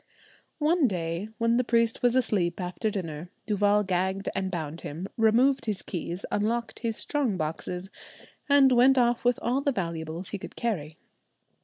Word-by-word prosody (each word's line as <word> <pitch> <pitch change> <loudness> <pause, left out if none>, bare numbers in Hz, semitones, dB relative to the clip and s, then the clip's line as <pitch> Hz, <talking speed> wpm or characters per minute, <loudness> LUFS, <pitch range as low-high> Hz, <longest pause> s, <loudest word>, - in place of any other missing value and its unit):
One 310 -1 +3
day, 175 0 -3
when 230 +1 +2
the 250 - +2
priest 230 -1 +1
was 245 -1 +3
asleep 200 -9 +1
after 180 +5 -2
dinner, 175 -5 -5 0.2
Duval 205 0 +2
gagged 190 +1 -1
and 190 0 -2
bound 165 -3 -5
him, 165 +6 -6
removed 240 +5 +3
his 210 -4 -2
keys, 175 +1 -5
unlocked 230 +3 -1
his 230 -2 -2
strong 270 -10 +1
boxes, 180 +4 -4 0.6
and 280 -2 +6
went 255 +2 +5
off 240 -1 +2
with 245 0 +3
all 255 +3 +1
the 280 - +1
valuables 170 - -4
he 205 - -4
could - - -9
carry. 160 -10 -3
210 Hz, 160 wpm, -27 LUFS, 180-240 Hz, 0.6 s, and